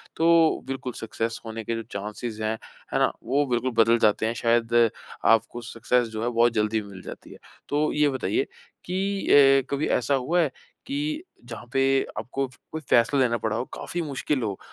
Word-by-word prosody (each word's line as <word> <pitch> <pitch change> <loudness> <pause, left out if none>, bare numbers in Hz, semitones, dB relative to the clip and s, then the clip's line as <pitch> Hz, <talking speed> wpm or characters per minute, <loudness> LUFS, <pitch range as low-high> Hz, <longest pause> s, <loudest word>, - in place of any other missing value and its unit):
तो 165 -1 +4
बिल्कुल 130 -2 -4
सक्सेस 115 +1 -3
होने 110 0 -5
के 115 +2 -2
जो 115 - -4
चांसेज़ 105 +2 -5
हैं, 110 +1 -1 0.4
है - - +2
ना? - - +3
वो 140 +3 +1
बिल्कुल 125 0 0
बदल 115 +1 +3
जाते 110 0 +3
हैं। 115 - 0
शायद 115 0 +1 0.5
आपको 115 +1 +3
सक्सेस 120 +1 0
जो 110 0 -4
है 120 - +1
बहुत 120 0 +3
जल्दी 110 0 +1
भी 100 - -11
मिल 95 -2 -10
जाती - - -10
है। - - -11 0.3
तो 150 +1 +1
ये 150 -1 +3
बताइए 130 -2 -1 0.4
कि 195 +2 -2 0.3
अ, 130 - -17
कभी 140 +2 -1
ऐसा 125 +3 +1
हुआ 135 +7 +1
है, 145 -5 0 0.3
कि 300 +4 -2 0.2
जहाँ 115 0 -8
पे 135 - +2 0.4
आपको 135 +4 -2 0.2
कोई 160 - -4
फ़ैसला 120 +4 +4
लेना 120 -2 +2
पड़ा 110 0 -2
हो, 120 +3 -2
काफ़ी 175 - -3
मुश्किल 140 -2 -2
हो 100 -3 -2
120 Hz, 190 wpm, -25 LUFS, 115-145 Hz, 0.5 s, तो